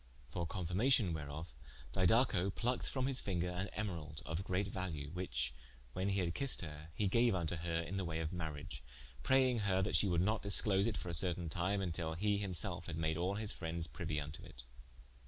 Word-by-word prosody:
For 85 Hz, -2 st, -2 dB
confirmation 95 Hz, +4 st, +2 dB
whereof, 75 Hz, +1 st, -5 dB, 0.4 s
Didaco 95 Hz, 0 st, +4 dB
plucked 125 Hz, +1 st, 0 dB
from 130 Hz, -2 st, -1 dB
his 135 Hz, -1 st, +6 dB
finger 90 Hz, -2 st, -1 dB
an 90 Hz, +2 st, -2 dB
Emeralde 80 Hz, -8 st, -4 dB
of 80 Hz, +4 st, -2 dB
great 95 Hz, +1 st, 0 dB
value, 80 Hz, -7 st, -4 dB
which 65 Hz, -9 st, -2 dB, 0.4 s
(when 95 Hz, +2 st, 0 dB
he 100 Hz, -1 st, +2 dB
had 85 Hz, -2 st, 0 dB
kissed 140 Hz, +5 st, +2 dB
her) 75 Hz, -1 st, -7 dB
he 105 Hz, -, +1 dB
gaue 115 Hz, +4 st, +4 dB
vnto 85 Hz, -2 st, -1 dB
her 85 Hz, 0 st, 0 dB
in 90 Hz, +4 st, -4 dB
the 95 Hz, -, 0 dB
waye 80 Hz, -2 st, -2 dB
of 80 Hz, +1 st, -2 dB
mariage, 75 Hz, -5 st, -4 dB, 0.4 s
praying 130 Hz, -2 st, +4 dB
her 95 Hz, -2 st, +2 dB
that 100 Hz, -, 0 dB
she 105 Hz, -, +4 dB
would 85 Hz, -3 st, +2 dB
not 110 Hz, +3 st, +2 dB
disclose 100 Hz, 0 st, +3 dB
it 115 Hz, -, -1 dB
for 90 Hz, -, -4 dB
a -, -, -2 dB
certaine 85 Hz, 0 st, -1 dB
time, 95 Hz, +4 st, 0 dB
vntill 80 Hz, -3 st, -2 dB
he 105 Hz, +2 st, +2 dB
him 95 Hz, -3 st, -2 dB
selfe 90 Hz, -2 st, -2 dB
had 80 Hz, -2 st, -4 dB
made 80 Hz, -1 st, +1 dB
all 90 Hz, +4 st, 0 dB
his 105 Hz, 0 st, -2 dB
frendes 80 Hz, -1 st, -2 dB
priuie 80 Hz, -2 st, -3 dB
vnto 75 Hz, 0 st, -5 dB
it. -, -, -11 dB
90 Hz, 205 wpm, -37 LUFS, 80-100 Hz, 0.4 s, his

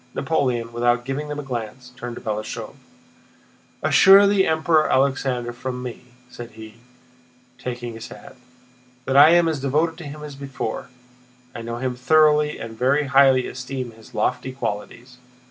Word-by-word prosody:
Napoleon, 125 Hz, -7 st, -1 dB
without 120 Hz, +1 st, +1 dB
giving 135 Hz, +3 st, -3 dB
them 150 Hz, 0 st, -5 dB
a -, -, -5 dB
glance, 125 Hz, 0 st, -6 dB
turned 120 Hz, -1 st, -7 dB
to -, -, -9 dB
Balashëv: 110 Hz, -1 st, -4 dB, 1.1 s
"Assure 195 Hz, +1 st, +7 dB
the 200 Hz, -1 st, +3 dB
Emperor 160 Hz, -1 st, +2 dB
Alexander 130 Hz, -3 st, 0 dB
from 125 Hz, +1 st, -5 dB
me," 125 Hz, -2 st, -7 dB, 0.3 s
said 120 Hz, -1 st, -10 dB
he, 110 Hz, 0 st, -12 dB, 0.8 s
taking 120 Hz, -1 st, -5 dB
his 115 Hz, -, -8 dB
hat, -, -, -13 dB, 0.7 s
"that 135 Hz, -, -1 dB
I 145 Hz, +3 st, +9 dB
am 170 Hz, 0 st, +5 dB
as 160 Hz, -3 st, -1 dB
devoted 155 Hz, +5 st, 0 dB
to 175 Hz, -, -8 dB
him 150 Hz, +1 st, -8 dB
as 150 Hz, -1 st, -8 dB
before: 135 Hz, -5 st, -5 dB, 0.6 s
I -, -, -7 dB
know 115 Hz, +1 st, -5 dB
him 125 Hz, 0 st, -3 dB
thoroughly 150 Hz, +3 st, +3 dB
and 115 Hz, 0 st, -8 dB
very 135 Hz, +5 st, +2 dB
highly 135 Hz, -2 st, +4 dB
esteem 130 Hz, -1 st, -6 dB
his 110 Hz, -1 st, -17 dB
lofty 130 Hz, -, -1 dB
qualities. 125 Hz, +1 st, -6 dB
130 Hz, 155 wpm, -22 LUFS, 120-150 Hz, 1.1 s, I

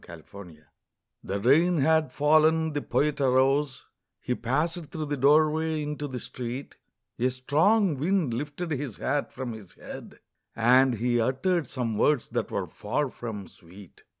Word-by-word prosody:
THE 85 Hz, -2 st, -11 dB
POET'S 90 Hz, -6 st, -12 dB
HAT 75 Hz, -, -26 dB, 0.6 s
The 100 Hz, +1 st, -3 dB
rain 160 Hz, -, +4 dB
had 155 Hz, -1 st, +2 dB
fallen, 155 Hz, +2 st, +3 dB
the 145 Hz, -, -2 dB
Poet 145 Hz, 0 st, 0 dB
arose, 135 Hz, +1 st, +2 dB, 0.3 s
He 125 Hz, -, -2 dB
passed 155 Hz, +8 st, -1 dB
through 155 Hz, +1 st, -5 dB
the 145 Hz, 0 st, -2 dB
doorway 155 Hz, +3 st, +3 dB
into 150 Hz, 0 st, -4 dB
the 130 Hz, -2 st, -5 dB
street, 125 Hz, +3 st, -7 dB, 0.4 s
A 125 Hz, +2 st, +2 dB
strong 155 Hz, -, +2 dB
wind 165 Hz, -4 st, +1 dB
lifted 145 Hz, +7 st, -4 dB
his 140 Hz, -6 st, -3 dB
hat 145 Hz, +1 st, -1 dB
from 130 Hz, -1 st, -5 dB
his 105 Hz, -5 st, -12 dB
head, -, -, -10 dB, 0.4 s
And 125 Hz, +2 st, +4 dB
he 120 Hz, +1 st, +1 dB
uttered 140 Hz, +7 st, 0 dB
some 115 Hz, -5 st, -3 dB
words 150 Hz, -5 st, +2 dB
that -, -, -2 dB
were -, -, -2 dB
far 130 Hz, +6 st, -3 dB
from 105 Hz, -5 st, -7 dB
sweet. 90 Hz, +2 st, -16 dB
135 Hz, 155 wpm, -27 LUFS, 120-155 Hz, 0.6 s, rain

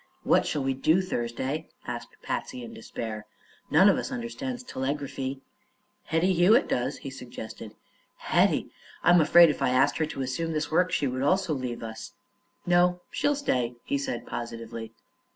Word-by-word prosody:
"What -, -, +3 dB
shall 145 Hz, -, -1 dB
we 135 Hz, 0 st, +1 dB
do, 155 Hz, +7 st, +3 dB
Thursday?" 130 Hz, -4 st, -3 dB, 0.2 s
asked -, -, -6 dB
Patsy 255 Hz, -1 st, -4 dB
in 230 Hz, -1 st, -9 dB
despair. 115 Hz, -, -6 dB, 0.4 s
"None 190 Hz, -, +6 dB
of 200 Hz, -, +4 dB
us -, -, -4 dB
understands 245 Hz, 0 st, -4 dB
telegraphy." 135 Hz, -, -3 dB, 0.6 s
"Hetty 165 Hz, +4 st, +2 dB
Hewitt 185 Hz, +9 st, +5 dB
does," 125 Hz, +3 st, -1 dB
he 135 Hz, -, -7 dB
suggested. 115 Hz, -4 st, -9 dB, 0.4 s
"Hetty! -, -, +2 dB, 0.3 s
I'm 175 Hz, -1 st, +6 dB
afraid 170 Hz, +1 st, +7 dB
if -, -, -7 dB
I -, -, +3 dB
asked 135 Hz, +3 st, +3 dB
her 155 Hz, -, +1 dB
to 135 Hz, -3 st, -4 dB
assume 160 Hz, +6 st, -2 dB
this 155 Hz, 0 st, -2 dB
work 180 Hz, +3 st, +3 dB
she -, -, +1 dB, 0.2 s
also 185 Hz, +3 st, +2 dB
would 135 Hz, -, -3 dB
leave 120 Hz, -2 st, -4 dB
us." 110 Hz, 0 st, -7 dB, 0.5 s
"No; 180 Hz, 0 st, +3 dB
she'll 290 Hz, 0 st, +1 dB
stay," 125 Hz, -, -1 dB
he 280 Hz, 0 st, 0 dB
said 270 Hz, -1 st, -4 dB
positively. 115 Hz, -1 st, -6 dB
150 Hz, 160 wpm, -27 LUFS, 125-185 Hz, 0.6 s, afraid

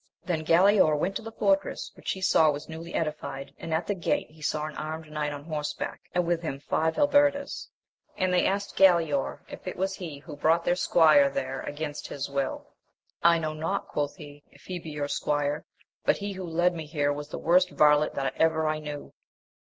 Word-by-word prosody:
Then 165 Hz, -3 st, -1 dB
Galaor 170 Hz, -1 st, +5 dB
went 195 Hz, +6 st, -1 dB
to -, -, -9 dB
the 225 Hz, 0 st, -8 dB
fortress, 195 Hz, -3 st, 0 dB
which -, -, -4 dB
he 190 Hz, -, -8 dB
saw 160 Hz, -4 st, +5 dB
was 145 Hz, 0 st, -3 dB
newly 165 Hz, +1 st, -7 dB
edified, 150 Hz, -3 st, -3 dB
and 165 Hz, -, -6 dB
at 160 Hz, +1 st, 0 dB
the 205 Hz, -, 0 dB
gate 175 Hz, -4 st, -1 dB
he 155 Hz, 0 st, -18 dB
saw 155 Hz, 0 st, -1 dB
an 155 Hz, -, -7 dB
armed 155 Hz, 0 st, -6 dB
knight 150 Hz, -1 st, -2 dB
on 145 Hz, -1 st, -7 dB
horseback, 150 Hz, -2 st, -4 dB
and 180 Hz, -1 st, +2 dB
with 170 Hz, -1 st, 0 dB
him 140 Hz, -5 st, -4 dB
five 160 Hz, +3 st, 0 dB
halberders, 285 Hz, -1 st, +2 dB, 0.5 s
and 185 Hz, -1 st, +1 dB
they 180 Hz, -, +3 dB
asked 200 Hz, +1 st, -2 dB
Galaor 165 Hz, -7 st, +3 dB
if -, -, -10 dB
it 185 Hz, -, -3 dB
was 190 Hz, +1 st, 0 dB
he 170 Hz, -6 st, -7 dB
who 150 Hz, +1 st, -10 dB
brought 165 Hz, +3 st, +2 dB
their -, -, +3 dB
AMADIS 180 Hz, -, 0 dB
OF -, -, -16 dB
GAUL. 165 Hz, -, +7 dB
99 225 Hz, -, +8 dB
squire 280 Hz, -1 st, +5 dB
there 135 Hz, 0 st, -5 dB
against 145 Hz, 0 st, -5 dB
his 140 Hz, 0 st, -5 dB
will 140 Hz, -1 st, -1 dB, 0.6 s
1 170 Hz, -, +6 dB
I -, -, +3 dB
know 155 Hz, -1 st, -2 dB
not, 165 Hz, +6 st, -3 dB
quoth 145 Hz, -1 st, -2 dB
he, 145 Hz, -4 st, -12 dB
if -, -, -20 dB
he 180 Hz, -1 st, -5 dB
be 165 Hz, -, -9 dB
your 150 Hz, -1 st, -3 dB
squire, 145 Hz, +1 st, -1 dB, 0.4 s
but -, -, +3 dB
he 205 Hz, 0 st, -4 dB
who 190 Hz, -1 st, -6 dB
led 175 Hz, +2 st, +2 dB
me 160 Hz, -3 st, -6 dB
here 145 Hz, -2 st, 0 dB
was 145 Hz, 0 st, -7 dB
the -, -, -5 dB
worst 180 Hz, +2 st, +3 dB
varlet 150 Hz, -2 st, +4 dB
that 135 Hz, -1 st, -1 dB
ever 160 Hz, -1 st, +2 dB
I 155 Hz, 0 st, 0 dB
knew. 150 Hz, -1 st, -7 dB
160 Hz, 225 wpm, -27 LUFS, 150-180 Hz, 0.6 s, 99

